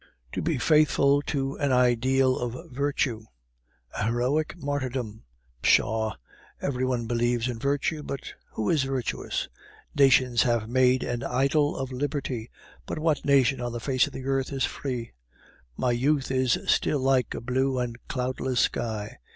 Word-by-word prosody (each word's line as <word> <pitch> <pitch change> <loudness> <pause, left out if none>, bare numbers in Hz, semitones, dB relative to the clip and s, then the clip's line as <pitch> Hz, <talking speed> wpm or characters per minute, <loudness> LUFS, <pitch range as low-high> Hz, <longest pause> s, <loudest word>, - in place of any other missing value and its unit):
"To - - -3
be 160 -3 0
faithful 145 -1 +4
to 135 -1 -2
an 145 -2 +1
ideal 130 +1 +3
of 125 +2 -5
virtue! 135 -4 -1 0.7
A 105 - -1
heroic 130 +8 0
martyrdom! 130 -7 -3 0.4
Pshaw! 110 0 +2 0.4
every 130 -2 -2
one 125 -2 0
believes 120 +1 0
in 120 -2 -4
virtue, 145 +4 0
but 140 -2 -6 0.2
who 110 - -2
is 155 - +3
virtuous? 135 -2 -2 0.5
Nations 130 -3 +5
have 120 -3 +1
made 130 +1 +3
an 120 0 -3
idol 140 +4 +1
of 135 -1 -4
Liberty, 130 -3 -3 0.4
but - - -4
what 155 -1 0
nation 135 -2 +3
on 120 -1 -3
the 120 - -3
face 130 +1 +2
of - - -10
the 130 - -7
earth 135 0 0
is 135 -3 0
free? 125 -4 -4 0.7
My 125 - +1
youth 135 +3 +1
is 130 -2 +2
still 150 - +2
like 130 -1 +2
a - - -3
blue 130 +2 0
and 120 -2 -2
cloudless 130 -1 -2
sky. 110 - -2
130 Hz, 150 wpm, -26 LUFS, 120-140 Hz, 0.7 s, Nations